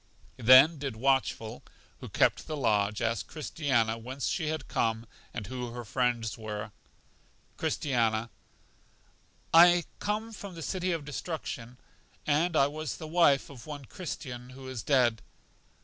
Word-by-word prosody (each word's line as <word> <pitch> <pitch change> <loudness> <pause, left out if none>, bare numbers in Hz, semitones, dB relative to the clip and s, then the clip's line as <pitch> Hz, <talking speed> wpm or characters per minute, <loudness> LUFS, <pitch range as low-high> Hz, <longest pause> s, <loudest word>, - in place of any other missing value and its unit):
Then 130 +6 +7
did 135 -5 -4
Watchful, 125 -2 0 0.4
who - - -8
kept - - +2
the 155 - -3
lodge, 105 -5 +1
ask 115 +1 -1
Christiana 130 -8 0
whence 130 +4 -5
she 160 -4 -1
had 155 0 -3
come 115 0 0 0.3
and 110 -4 -5
who 125 +2 -5
her 120 -1 -6
friends 120 -1 -1
were. 105 -1 -5 0.8
Christiana: 115 -4 0 1.2
I 175 +1 +8 0.2
come 215 +2 -2
from 200 -3 -8
The 165 - -7
City 185 +1 -1
of 165 -4 -2
Destruction, 140 -5 -5 0.5
and 160 +3 +2
I 135 - +5
was 150 0 -4
the 160 - -7
wife 155 -5 +3
of 125 -2 -12
one 145 -2 -7
Christian, 125 -7 -7
who 130 +1 -10
is 130 -4 -5
dead. 120 -3 +2
130 Hz, 140 wpm, -29 LUFS, 115-155 Hz, 1.2 s, I